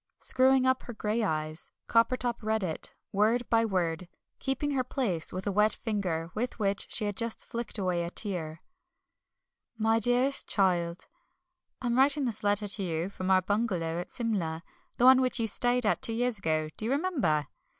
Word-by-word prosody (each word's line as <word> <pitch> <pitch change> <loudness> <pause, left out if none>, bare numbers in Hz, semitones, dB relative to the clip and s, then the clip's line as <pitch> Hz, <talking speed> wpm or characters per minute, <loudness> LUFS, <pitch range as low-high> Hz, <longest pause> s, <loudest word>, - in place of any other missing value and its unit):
Screwing 260 0 +4
up 260 0 +2
her 240 - -8
grey 215 +2 -1
eyes, 155 -4 -2 0.2
Coppertop 235 +1 +1
read 220 -1 -1
it, 160 -4 -4 0.2
word 225 +4 +2
by 230 0 +4
word, 180 -5 -1 0.3
keeping 270 +2 -1
her 265 -2 0
place 230 - -1
with 185 +1 -5
a 205 - 0
wet 210 +2 +3
finger 180 -7 -3
with 240 +4 -3
which 200 -2 -1
she 215 - -1
had 205 -1 -2
just 230 +1 -3
flicked 235 -1 -5
away 180 -3 0
a 170 - -4
tear: 170 -5 -2 1.1
My 225 +1 +2
Dearest 245 +4 +3
Child, 175 -3 +1 0.8
I - - -3
am 240 +1 +1
writing 280 +1 +3
this 225 -4 -3
letter 205 0 +2
to 200 +1 +1
you 170 -1 -2
from 185 -1 -4
our 185 -1 +4
bungalow 185 -5 -1
at - - -9
Simla 175 -9 -2 0.3
the 245 - +3
one 260 0 +9
in - - +2
which 255 -1 +1
you 230 - +1
stayed 245 +2 +2 0.2
two 225 - 0
years 240 -2 0
ago 155 -3 -1
do 215 - -5
you - - -1
remember? 265 - +1
215 Hz, 180 wpm, -29 LUFS, 180-245 Hz, 1.1 s, one